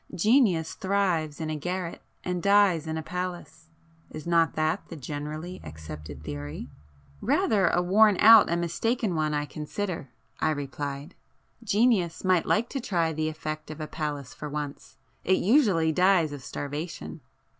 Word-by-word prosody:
Genius 195 Hz, -, +3 dB
thrives 185 Hz, -7 st, 0 dB
in 155 Hz, -1 st, -3 dB
a -, -, -2 dB
garret 180 Hz, +3 st, -4 dB, 0.2 s
and 180 Hz, -1 st, -2 dB
dies 200 Hz, -5 st, +4 dB
in 160 Hz, 0 st, -2 dB
a 160 Hz, -, -4 dB
palace,—is 165 Hz, -3 st, -8 dB
not 170 Hz, -1 st, +2 dB
that 155 Hz, +4 st, 0 dB
the 165 Hz, -, -7 dB
generally 150 Hz, +5 st, -6 dB
accepted 75 Hz, -2 st, -9 dB
theory?" 75 Hz, 0 st, -6 dB, 0.5 s
"Rather 200 Hz, -5 st, +2 dB
a 175 Hz, +1 st, +2 dB
worn 205 Hz, +2 st, +5 dB
out 225 Hz, 0 st, +8 dB
and 170 Hz, +1 st, +1 dB
mistaken 215 Hz, +5 st, -1 dB
one 155 Hz, -2 st, 0 dB
I 145 Hz, 0 st, -1 dB
consider,"—I 150 Hz, -, -5 dB
replied; 145 Hz, +1 st, -4 dB, 0.5 s
"Genius 205 Hz, -6 st, +2 dB
might 185 Hz, -3 st, +2 dB
like 225 Hz, +2 st, +2 dB
to 275 Hz, -, -3 dB
try 170 Hz, -7 st, 0 dB
the 155 Hz, 0 st, -1 dB
effect 155 Hz, 0 st, -6 dB
of 155 Hz, 0 st, -8 dB
a 155 Hz, -, -3 dB
palace 145 Hz, -4 st, -5 dB
for 150 Hz, -, -7 dB
once,—it 150 Hz, +5 st, -4 dB
usually 195 Hz, -, +3 dB
dies 180 Hz, -3 st, +3 dB
of 145 Hz, -, -7 dB
starvation." 150 Hz, +3 st, -6 dB
165 Hz, 145 wpm, -27 LUFS, 150-185 Hz, 0.5 s, out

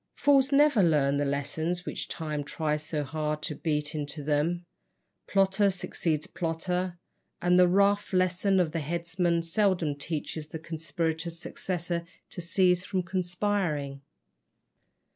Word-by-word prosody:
Fools 280 Hz, -1 st, +4 dB
never 285 Hz, -5 st, +5 dB
learn 145 Hz, -5 st, +3 dB
the 145 Hz, -, +1 dB
lessons 160 Hz, +5 st, -1 dB
which -, -, -4 dB
Time 150 Hz, -3 st, -3 dB
tries 150 Hz, 0 st, -1 dB
so 155 Hz, -2 st, -2 dB
hard 150 Hz, +2 st, -3 dB
to 155 Hz, -, -2 dB
beat 150 Hz, 0 st, -2 dB
into 150 Hz, -1 st, -4 dB
them. 155 Hz, +4 st, 0 dB, 0.6 s
Plotter 195 Hz, +1 st, +3 dB
succeeds 165 Hz, -4 st, -1 dB
plotter, 180 Hz, +1 st, -2 dB, 0.4 s
and 180 Hz, +1 st, +4 dB
the 180 Hz, -, +7 dB
rough 200 Hz, +3 st, +3 dB
lesson 185 Hz, +1 st, +2 dB
of 170 Hz, -4 st, +2 dB
the 165 Hz, -, -1 dB
headsman 170 Hz, +2 st, 0 dB
seldom 175 Hz, -3 st, +1 dB
teaches 150 Hz, +1 st, -4 dB
the 160 Hz, -, -6 dB
conspirator's 165 Hz, +1 st, -3 dB
successor 175 Hz, 0 st, -3 dB, 0.3 s
to 180 Hz, -, -6 dB
cease 180 Hz, +1 st, +2 dB
from 185 Hz, 0 st, -1 dB
conspiring. 175 Hz, -6 st, -1 dB
170 Hz, 130 wpm, -28 LUFS, 155-185 Hz, 0.6 s, the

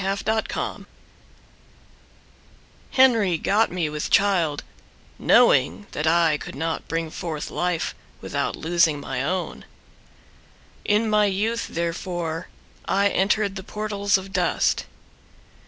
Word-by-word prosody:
Amanda 195 Hz, +1 st, -1 dB
Barker 220 Hz, 0 st, -2 dB, 2.1 s
Henry 230 Hz, -9 st, +4 dB
got 210 Hz, +7 st, +2 dB
me 175 Hz, -3 st, -1 dB
with 150 Hz, 0 st, -4 dB
child, 175 Hz, -7 st, +2 dB, 0.6 s
Knowing 90 Hz, +7 st, +4 dB
that 155 Hz, -, -2 dB
I 165 Hz, -2 st, +3 dB
could -, -, -8 dB
not 160 Hz, +3 st, -3 dB
bring 165 Hz, -1 st, -2 dB
forth 160 Hz, -3 st, -5 dB
life 180 Hz, -1 st, -1 dB, 0.3 s
Without -, -, -2 dB
losing 165 Hz, -2 st, +2 dB
my 135 Hz, -2 st, -3 dB
own. 180 Hz, +5 st, -3 dB, 1.2 s
In 210 Hz, +2 st, +2 dB
my 210 Hz, -1 st, +3 dB
youth 215 Hz, +4 st, -1 dB
therefore 170 Hz, 0 st, -3 dB, 0.4 s
I 200 Hz, +1 st, +2 dB
entered 200 Hz, +1 st, +1 dB
the 190 Hz, -, -6 dB
portals 205 Hz, -1 st, 0 dB
of 190 Hz, 0 st, -9 dB
dust. -, -, +1 dB
180 Hz, 110 wpm, -23 LUFS, 160-205 Hz, 2.1 s, Henry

